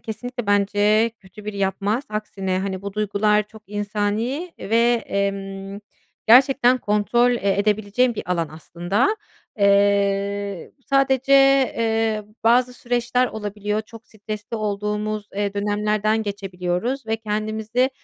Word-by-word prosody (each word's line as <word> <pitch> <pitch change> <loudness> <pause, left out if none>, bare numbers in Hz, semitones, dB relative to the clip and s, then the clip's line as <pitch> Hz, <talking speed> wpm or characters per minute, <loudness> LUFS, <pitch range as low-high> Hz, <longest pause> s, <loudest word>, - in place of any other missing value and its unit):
kesinlikle 240 +1 -6
bence 205 +2 +3
kötü 200 +2 -14
biri 210 -1 -5
yapmaz. 200 +5 -1
Aksine, 200 -3 -3
hani, 190 0 -3
bu 200 -1 -5
duygular 210 0 +2
çok 215 +1 -16
insani 210 - -2
ve, 235 +2 +2
emm, 195 0 -3 0.5
gerçekten 255 +1 +6
kontrol, 210 +4 +2
eee, 200 -5 0
edebileceğin 215 +4 +1
bir 180 - -6
alan 170 -3 0
aslında. 175 - -1 0.4
Eee, 200 -1 +1
sadece, 270 -1 +2 0.4
eee, 225 -1 0 0.2
bazı 245 +2 +4
süreçler 245 0 0
olabiliyor. 210 -1 -3
Çok 225 +2 -14
stresli 215 +2 -7
olduğumuz, 210 0 -2
eee, 205 0 -2
dönemlerden 210 +1 0
geçebiliyoruz 200 +4 -3
ve 220 - 0
kendimizi, 220 +3 -1
210 Hz, 115 wpm, -22 LUFS, 200-230 Hz, 0.5 s, gerçekten